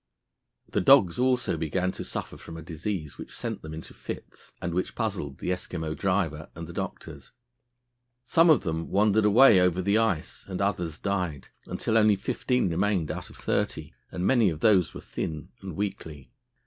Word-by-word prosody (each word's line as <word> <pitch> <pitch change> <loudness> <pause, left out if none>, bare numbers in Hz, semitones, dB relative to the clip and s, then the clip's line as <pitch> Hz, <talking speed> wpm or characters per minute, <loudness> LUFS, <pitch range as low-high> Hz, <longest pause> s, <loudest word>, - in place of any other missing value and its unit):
The - - 0
dogs 100 -3 +6
also 125 -7 +2
began 85 +4 -1
to - - -6
suffer - - -5
from 80 - -10
a 80 - -8
disease 85 -1 -5
which - - -8
sent - - -4
them 80 - -8
into 80 +1 -8
fits, - - -9
and 85 -1 -3
which 90 +2 -2
puzzled 70 -2 -3
the - - -2
Eskimo 80 -3 -3
driver 90 -6 -1
and 85 0 -6
the 85 - -9
doctors. - - -6 0.9
Some 165 +5 +4
of 155 -6 +6
them 80 -2 -3
wandered 105 +1 +3
away 110 0 +7
over 90 0 +3
the 100 +4 +2
ice 100 -9 -1
and 95 -2 -4
others 90 -6 -1
died, 90 -8 -2 0.2
until 110 - +1
only 105 -1 +5
fifteen 125 +5 0
remained 90 -1 0
out - - -6
of - - -14
thirty, - - -2 0.2
and 90 - -3
many 120 -5 +4
of 80 -2 -5
those 100 -6 +4
were - - -7
thin 80 -2 -5
and 95 -4 -7
weakly. 80 -8 -5
90 Hz, 175 wpm, -27 LUFS, 80-105 Hz, 0.9 s, away